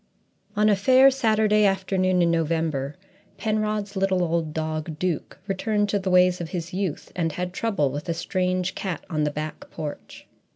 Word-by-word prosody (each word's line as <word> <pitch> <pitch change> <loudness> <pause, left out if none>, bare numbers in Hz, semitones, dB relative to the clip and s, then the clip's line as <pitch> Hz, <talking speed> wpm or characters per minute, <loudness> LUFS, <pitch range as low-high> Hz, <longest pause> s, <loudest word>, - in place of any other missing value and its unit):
GIPSY 210 - -1
On 215 - +5
a 205 - +5
fair 260 +7 +6
Saturday 220 -4 +3
afternoon 185 -2 +2
in 170 - +3
November 160 -4 -1 0.4
Penrod's 215 -2 -1
little 190 -1 +1
old 165 -2 0
dog 155 0 -3
Duke 175 -2 -2
returned 205 +1 0
to 205 - +1
the 190 0 -2
ways 180 0 +4
of 165 - -5
his 175 -1 -5
youth 185 -4 -3
and 165 -3 -1
had 180 0 -4
trouble 195 -11 0
with 145 +5 -5
a 165 - 0
strange 185 +1 -1
cat 180 -6 -4
on 155 -1 +1
the - - +1
back 155 +1 -6
porch. 150 -2 -7
180 Hz, 175 wpm, -25 LUFS, 160-205 Hz, 0.4 s, fair